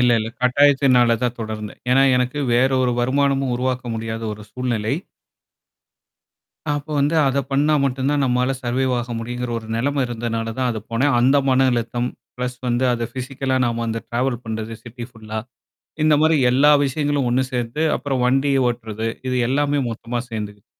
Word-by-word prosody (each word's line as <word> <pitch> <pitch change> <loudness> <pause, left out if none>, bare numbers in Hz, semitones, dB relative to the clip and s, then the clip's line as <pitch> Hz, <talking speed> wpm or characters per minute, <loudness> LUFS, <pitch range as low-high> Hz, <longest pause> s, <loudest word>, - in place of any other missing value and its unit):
இல்ல 125 0 +4
இல்ல. 110 0 -3
கட்டாயத்தினாலதான் 125 -3 +3
தொடர்ந்தேன். 110 -1 -6
ஏன்னா 135 +2 +5
எனக்கு 125 +3 -1 0.2
வேறொரு 130 0 +3
வருமானமும் 135 +1 +1
உருவாக்க 130 0 -2
முடியாத 115 0 -4
ஒரு 105 0 -9
சூழ்நிலை. 120 -2 -1 1.8
அப்ப 145 +1 -2
வந்து 145 +3 +2
அதை 135 +1 +2
பண்ணா 145 +3 +3
மட்டும்தான் 135 +2 0
நம்மால 125 0 +1
சர்வேவ் 130 +2 0
ஆக 120 0 -4
முடியும்ங்கிற 120 +1 -4
ஒரு 110 - -12
நிலைமை 140 +4 0
இருந்ததுனாலதான் 115 +1 -2
அதுக்கு 110 -2 -6
போனேன். 135 +4 +2
அந்த 130 +3 +4
மன 130 0 +4
அழுத்தம் 120 +1 -1 0.3
பிளஸ் 125 0 -3
வந்து 120 +1 +1
அது 120 -1 -1
பிஸிக்கலா 130 0 -2
நாம 115 -1 -1
அந்த 115 0 -2
டிராவல் 125 0 -1
பண்றது 110 0 -4
சிட்டி 120 0 -8
ஃபுல்லா 110 -2 -7 0.7
இந்த 155 0 +5
மாதிரி 160 +1 +4 0.2
எல்லா 140 +4 +5
விஷயங்களும் 145 -1 0
ஒண்ணு 130 +2 +2
சேர்த்து 120 +4 -2
அப்புறம் 140 -3 -2
வண்டி 135 +3 +2 0.2
ஓட்டறது, 115 -2 -3 0.2
இது 130 - 0
எல்லாமே 145 +2 +1
மொத்தமா 115 +1 -4
சேர்ந்துக்குது. 105 -2 -6
125 Hz, 150 wpm, -21 LUFS, 115-135 Hz, 1.8 s, ஏன்னா